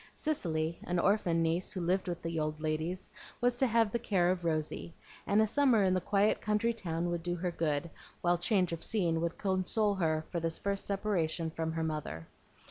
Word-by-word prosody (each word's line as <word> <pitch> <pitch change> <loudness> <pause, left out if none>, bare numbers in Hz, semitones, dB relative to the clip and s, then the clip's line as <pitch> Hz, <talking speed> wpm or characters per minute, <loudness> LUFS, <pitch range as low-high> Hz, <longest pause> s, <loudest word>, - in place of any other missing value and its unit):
Cicely, 165 - -1
an 180 - -1
orphan 175 -3 +2
niece 165 +3 0
who 190 - -3
lived 180 +2 0
with 175 -1 -4
the 165 -1 -2
old 155 0 -2
ladies, 155 +4 -2 0.3
was 245 0 +2
to 265 - +3
have 230 -2 +3
the 235 - 0
care 185 -6 +2
of 180 -1 -2
Rosy; 160 0 -2 0.3
and 210 +2 +4
a - - +4
summer 240 -2 +4
in 185 -1 +3
the 185 - +1
quiet 200 +3 +2
country 215 +2 +1
town 175 -5 -2
would 170 -1 -2
do 175 +1 -2
her 180 +1 -2
good, 160 -2 -1 0.3
while 175 0 +2
change 180 -1 +2
of 165 - -4
scene 170 -7 +1
would 170 0 -2
console 200 +2 +1
her 160 -4 0
for 170 - -1
this 165 0 -1
first 200 -1 -2
separation 175 -5 0
from 160 0 -3
her 165 0 -1
mother. 150 - -4
175 Hz, 205 wpm, -32 LUFS, 165-200 Hz, 0.3 s, and